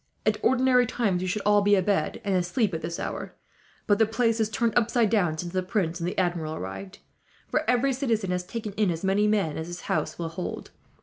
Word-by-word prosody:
At 215 -1 +1
ordinary 250 0 +4
times 205 -7 0
we 185 - -2
should 200 +3 -2
all 205 0 +5
be 205 0 +4
abed 195 +1 0
and 200 - 0
asleep 185 +3 +1
at 160 - -3
this 170 +1 -4
hour, - - -5 0.5
but 205 -1 +3
the 220 - +5
place 225 0 +1
is 220 -1 +1
turned 225 +1 0
upside 235 -2 +2
down 175 -8 +2
since 175 +2 -5
the 185 - +1
prince 180 -2 -1
and 170 +1 -1
the - - -7
Admiral 175 -4 -1
arrived; 95 -4 -7 0.5
for - - 0
every 250 +2 +3
citizen 230 -8 -1
has 180 0 -1
taken 215 +2 -6
in 210 -3 +3
as 165 0 -3
many 195 +2 +2
men 200 -9 +1
as 160 - -5
his 175 0 -7
house 155 - -2
will 170 -1 -3
hold. 165 +2 -6
200 Hz, 225 wpm, -26 LUFS, 175-225 Hz, 0.5 s, all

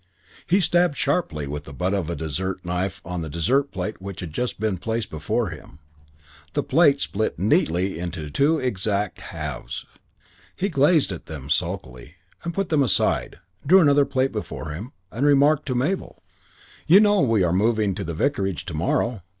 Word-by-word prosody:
He 185 +3 +4
stabbed 175 -4 +2
sharply 135 - 0
with 75 +1 -5
the 70 - -10
butt 90 +5 -1
of 95 -5 -1
a 85 - -2
dessert 90 +5 -3
knife 90 +2 -2
on 90 0 -4
the 80 - -5
dessert 130 - +1
plate 95 -1 -4
which 100 -2 -7
had 85 -4 -7
just 125 +4 -2
been 105 -4 -1
placed 115 +4 -3
before 85 +8 -1
him. 75 -2 -11 0.8
The - - 0
plate 145 -1 +4
split 110 +2 -2
neatly 90 -1 +1
into 80 -4 -5
two 150 - +3
exact 105 - -1
halves. 75 -7 -6 0.7
He 195 +2 -1
gazed 150 - +3
at 90 - -7
them 70 -3 -7
sulkily, 85 -5 -3 0.4
put 195 +1 -2
them 155 -3 +3
aside, 115 -7 +1 0.2
drew 185 +7 +6
another 145 -4 +5
plate 135 -1 0
before 105 -7 -5
him, 100 - -7 0.2
and 120 +5 -3
remarked 145 +1 +4
to 130 - -1
Mabel: 145 +10 -2 0.6
"You 180 +5 +8
know 205 -2 +4
we 115 -6 +3
are 85 -1 +1
moving 110 +2 +2
into 100 +1 -3
the 85 -2 -4
vicarage 95 - -1
to 90 - -6
morrow? 95 +7 0
100 Hz, 175 wpm, -23 LUFS, 85-140 Hz, 0.8 s, You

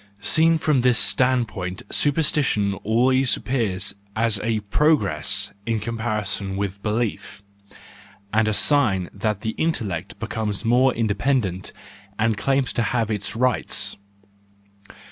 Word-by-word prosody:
Seen 160 +9 +4
from 150 -4 +1
this 125 -2 +3
standpoint 110 -9 +1
supersti¬ 150 0 +1
tion 100 -5 0
always 130 +4 +2
appears 105 -8 -1 0.2
as 110 -2 +1
a 110 -1 -1
progress 100 - +1 0.2
in 115 -1 0
comparison 105 -3 -3
with 100 0 -4
belief, 105 -1 -3 0.9
and 110 0 +2
as 110 - +2
a - - +6
sign 110 - +2
that 105 0 -2
the 110 - -2
intellect 105 - -2
becomes 105 0 -4
more 125 +3 +4
independent 105 -4 -1 0.5
and 110 0 +1
claims 135 +5 0
to - - 0
have 115 -1 -1
its 105 -1 -3
rights. 125 +1 +1
110 Hz, 125 wpm, -22 LUFS, 100-125 Hz, 0.9 s, a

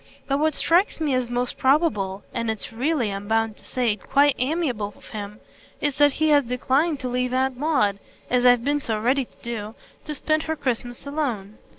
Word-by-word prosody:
But 275 0 +1
what 310 0 +1
strikes 350 +3 +2
me 305 -4 0
as 255 -2 0
most 245 0 -2
probable 260 - +2
and 230 -1 -2
it's 220 0 -4
really, 250 -2 0
I'm 200 +1 -6
bound 225 0 +1
to - - -18
say, 240 -4 0
quite 280 +7 +3
amiable 250 - -1
of - - -15
him 210 0 -7 0.4
is 290 -1 -1
that 290 -1 +5
he 315 +2 +1
has 290 -1 +5
declined 265 +5 0
to 255 - -2
leave 250 0 -1
Aunt 260 0 +1
Maud, 245 -9 +1 0.3
as 250 0 +2
I've 245 -1 +5
been 290 +2 +1
so 225 -6 -2
ready 255 +4 +1
to - - -24
do, 225 -2 -5 0.3
to 300 - -4
spend 310 +2 +1
her 320 - +1
Christmas 245 -3 -3
alone. 245 -9 -3
250 Hz, 200 wpm, -24 LUFS, 225-290 Hz, 0.4 s, that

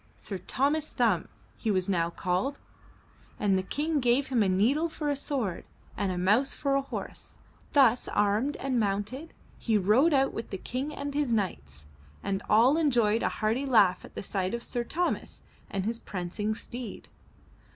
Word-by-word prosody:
Sir 195 -3 -6
Thomas 285 - 0
Thumb 220 -9 +1 0.3
he 225 - -2
was 185 -3 +1
now 170 -4 +1
called, 185 +10 -1 0.8
and 200 -2 +2
the 190 - +2
King 295 +10 -1
gave 255 +2 +2
him 250 -4 +2
a 200 - +3
needle 255 - +2
for 300 -2 -2
a - - 0
sword 260 - -2 0.3
and 200 -2 -1
a 180 - -3
mouse 210 +10 +2
for 280 -2 0
a 275 - +3
horse. 275 - -7 0.4
Thus 255 -4 +4
armed 210 +8 +1
and 260 -2 0
mounted, 210 +9 -2 0.2
he 225 -2 +2
rode 215 - +4
out 270 -2 +3
with 225 - -5
the 190 - -4
King 260 +9 -4
and 285 -1 -5
his 285 -3 0
knights, 75 - -2 0.4
and 195 0 -1
all 245 +9 +5
en 310 -3 +3
joyed 230 -3 +2
a - - +1
hearty 230 +6 -1
laugh 200 -8 +4
at - - -8
sight 190 +2 -1
of 235 - -6
Sir 240 - -2
Thomas 345 +8 -2 0.3
and 195 -1 -2
his 230 +1 -2
prancing 200 +4 -3
steed. 235 -1 -7
230 Hz, 175 wpm, -28 LUFS, 195-275 Hz, 0.8 s, all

